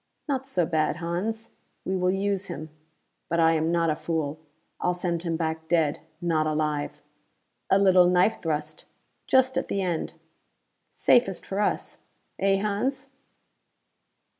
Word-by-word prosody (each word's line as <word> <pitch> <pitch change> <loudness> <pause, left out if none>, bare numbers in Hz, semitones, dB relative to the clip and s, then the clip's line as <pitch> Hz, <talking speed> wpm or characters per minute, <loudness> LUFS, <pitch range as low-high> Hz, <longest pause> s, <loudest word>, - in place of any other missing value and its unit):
"Not 270 -2 -1
so 180 -10 +1
bad, 155 -2 +1
Hans? 185 +7 -3 0.3
We 190 - -1
will 180 0 +1
use 195 0 0
him 155 +2 -7 0.6
but 170 - +1
I 165 0 +5
am 160 0 +1
not 165 -2 +2
a - - 0
fool. 155 -2 -2 0.4
I'll 180 - 0
send 175 -2 -2
him 165 -2 -2
back 160 -1 -3
dead, 160 -3 +2 0.2
not 165 -3 +1
alive! 150 -1 -2 0.7
A 195 - +5
little 185 -2 +6
knife 180 +5 +3
thrust, 155 -1 -3 0.4
just 260 0 +3
at - - -5
the 195 - -1
end! 175 -3 -2 0.8
Safest 235 -7 +2
for 195 - -3
us, 210 - -1 0.4
eh, 195 0 +3
Hans?" 260 +7 -2
175 Hz, 140 wpm, -26 LUFS, 160-195 Hz, 0.8 s, little